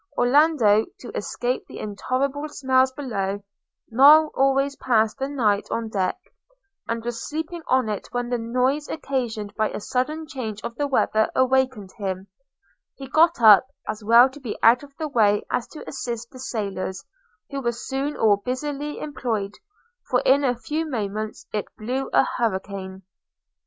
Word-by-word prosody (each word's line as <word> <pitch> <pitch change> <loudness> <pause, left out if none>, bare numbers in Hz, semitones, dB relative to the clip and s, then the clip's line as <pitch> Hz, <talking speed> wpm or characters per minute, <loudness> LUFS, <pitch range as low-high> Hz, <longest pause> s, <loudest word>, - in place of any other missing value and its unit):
Orlando, 245 -5 +4
to 240 - -9
escape 245 +4 -2
the - - -10
intolerable 265 +8 -2
smells 260 -2 +2
below, 205 -8 -3 0.5
now 295 +6 +7
always 275 +1 +2
passed 225 -4 +1
the 270 +1 -2
night 215 -8 +1
on 230 -1 -2
deck, 195 - -1 0.7
and 230 0 -3
was 240 -1 -4
sleeping 320 +3 -4
on 255 -3 +2
it 210 -2 -4
when 245 -1 -2
the 245 -1 -1
noise 255 +6 0
occasioned 235 -9 -3
by 215 0 0
a - - -5
sudden 300 +9 -2
change 225 -8 -5
of 235 - -4
the 290 +4 -2
weather 220 -5 +2
awakened 260 -6 +1
him: 190 -1 -3 0.7
he 270 - -9
got 330 +4 +4
up, 215 +3 +8 0.2
as 215 0 -4
well 235 +4 +7
to 290 - -12
be 245 -6 -5
out 235 +2 +6
of 280 -1 -15
the 315 - -3
way 210 -7 +2
as 245 - -1
to 310 - -11
assist 235 -4 -5
the 255 - -12
sailors, 200 -6 -4 0.5
who 275 0 -3
were 235 -2 0
soon 270 +4 -4
all 210 -2 +4
busily 285 +6 -4
employed; 225 -9 -3 0.6
for - - +2
in 280 +2 +4
a 250 -3 +1
few 305 +6 -2
moments 215 -3 -4
it 210 -2 -1
blew 255 +5 -3
a - - +5
hurricane. 195 -3 -3
245 Hz, 160 wpm, -24 LUFS, 215-275 Hz, 0.7 s, up